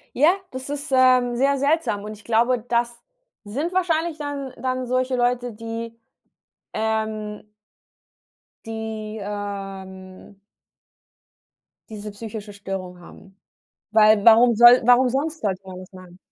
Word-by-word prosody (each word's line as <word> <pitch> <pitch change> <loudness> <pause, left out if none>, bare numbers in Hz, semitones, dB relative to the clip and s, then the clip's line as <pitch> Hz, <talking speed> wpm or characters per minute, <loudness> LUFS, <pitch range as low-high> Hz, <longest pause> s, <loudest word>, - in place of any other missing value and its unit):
Ja, 300 +6 +5 0.2
das 260 +1 -6
ist, 290 0 -5
ähm, 255 -2 +4
sehr 275 +2 +2
seltsam 280 -7 0
und 215 +1 -7
ich 210 - -15
glaube, 235 +2 +2
das 235 +1 -2 0.4
sind 290 - -3
wahrscheinlich 335 -3 0
dann 285 -3 -5
dann 255 -1 -2
solche 255 +1 0
Leute, 245 -1 0
die, 230 +1 -7 0.8
ähm 220 -1 -3 1.2
die, 220 -1 -6
ähm 195 -2 -7 1.5
diese 210 -1 -7
psychische 210 0 -8
Störung 190 -3 -7
haben. 190 +2 -16 0.6
Weil 215 -1 +5
warum 235 +1 +7
soll 240 +2 +8
warum 250 +1 +5
sonst 305 +5 -2
sollte 195 -3 -2
man 185 -1 -9
das 185 +1 -13
machen? 185 -1 -14
230 Hz, 120 wpm, -22 LUFS, 205-255 Hz, 1.5 s, soll